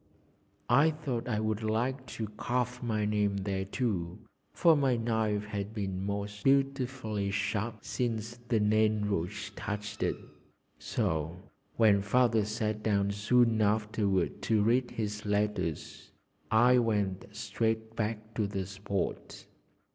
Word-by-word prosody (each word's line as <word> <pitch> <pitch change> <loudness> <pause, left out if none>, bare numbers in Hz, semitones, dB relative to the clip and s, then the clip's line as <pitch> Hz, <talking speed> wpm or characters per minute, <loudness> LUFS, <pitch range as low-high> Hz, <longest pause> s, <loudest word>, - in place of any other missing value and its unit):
I 145 +6 +5
thought 145 -7 -3
I 110 -4 0
would 110 0 -1
like 125 +4 -1
to 110 - -2
carve 125 +3 -2
my 110 -3 0
name 105 -1 +1
there 95 -1 -2
too, 95 -5 -2 0.3
for 165 -2 +5
my 135 -4 +2
knife 110 -2 0
had 105 0 -5
been 95 -3 -3
most 100 0 -4
beautifully 130 -6 +1
sharp 105 +2 -2
since 120 -1 -2
the 115 -2 +2
Nain 110 0 +3
Rouge 90 -4 -2
touched 105 0 -5
it, - - +1 0.6
so 80 +1 -1 0.4
when 105 -3 +5
Father 115 +1 +3
sat 110 0 -2
down 100 -2 +1
soon 110 +2 +3
afterward 105 -3 +1
to 110 -2 +2
read 120 +3 +2
his 105 -1 -4
letters, 105 -6 -2 0.4
I 120 +3 +5
went 105 -5 0
straight 110 0 -2
back 110 0 -3
to 105 -1 0
the 95 -2 -3
spot. 100 0 -4
110 Hz, 130 wpm, -30 LUFS, 100-115 Hz, 0.6 s, I